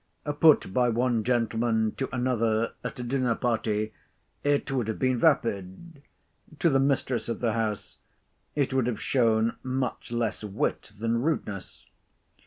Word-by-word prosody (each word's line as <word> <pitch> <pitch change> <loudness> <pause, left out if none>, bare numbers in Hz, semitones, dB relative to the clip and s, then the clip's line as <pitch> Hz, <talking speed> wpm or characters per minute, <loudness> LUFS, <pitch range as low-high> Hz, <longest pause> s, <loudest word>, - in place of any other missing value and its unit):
Put 155 -11 +5
by 125 +1 +3
one 120 -1 +1
gentleman 115 -2 +1
to 135 - -2
another 115 -3 +1
at - - -5
a - - -3
dinner 125 -1 0
party, 110 -3 -1 0.5
it 145 -1 +1
would 125 -5 0
have 110 - -2
been 130 -2 +1
vapid; 130 - 0 0.6
to 165 +1 +3
the 135 - +3
mistress 135 -3 0
of 115 - -2
the 115 -3 0
house, 110 -2 -3 0.6
it 140 -3 0
would 130 -3 +2
have 115 -4 -2
shown 115 -3 +2
much 130 -2 -3
less 120 -2 -1
wit 105 0 -2
than 115 +2 0
rudeness. 115 - -3
120 Hz, 145 wpm, -27 LUFS, 110-130 Hz, 0.6 s, Put